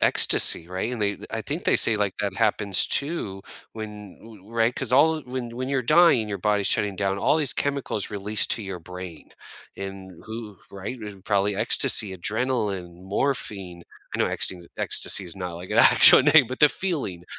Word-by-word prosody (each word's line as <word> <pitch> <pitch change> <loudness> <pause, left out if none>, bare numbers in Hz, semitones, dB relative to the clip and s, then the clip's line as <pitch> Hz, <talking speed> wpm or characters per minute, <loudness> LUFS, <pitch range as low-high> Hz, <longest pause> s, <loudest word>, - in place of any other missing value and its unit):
ecstasy, 85 - +6
right, 95 +7 -5
and 120 - -7
they 100 -1 -2
I 115 - -5
think 145 - -7
they - - +2
say, 110 - +3
like, 100 -2 -3
that 100 -2 -4
happens, 100 -2 0
too, 125 - -4 0.3
when 105 -3 -11
ooh 110 -2 -17
right, 115 +1 -1
'cause 125 -3 -5
all 155 +4 +2
when 125 -2 -8
when 130 +1 -5
you're 135 -2 -2
dying, 150 -7 +2
your 100 - -5
body's 105 +1 -1
shutting 100 -2 -1
down, 100 -1 -3
all 145 - 0
these 140 -4 +2
chemicals 140 -8 -3
release 105 +1 -1
to 115 - 0
your 95 -3 -8
brain, 90 -1 -12 0.5
and 95 -1 -9 0.2
who 110 -3 -10
right, 100 +6 -9
and 105 -4 -12
probably 100 -1 -1
ecstasy, 100 0 +5
adrenaline, 100 -5 -4
morphine 95 -5 -4 0.3
I - - -4
know - - 0
ecste 90 -2 -1
ecstasy 95 - +2
is 85 - -7
not, 90 -2 -7
like, 90 +2 -11
an - - -1
actual - - +6
name, 150 -1 +4
but 130 - -8
the 150 - +6
feeling 140 - -5
105 Hz, 185 wpm, -22 LUFS, 95-125 Hz, 0.5 s, ecstasy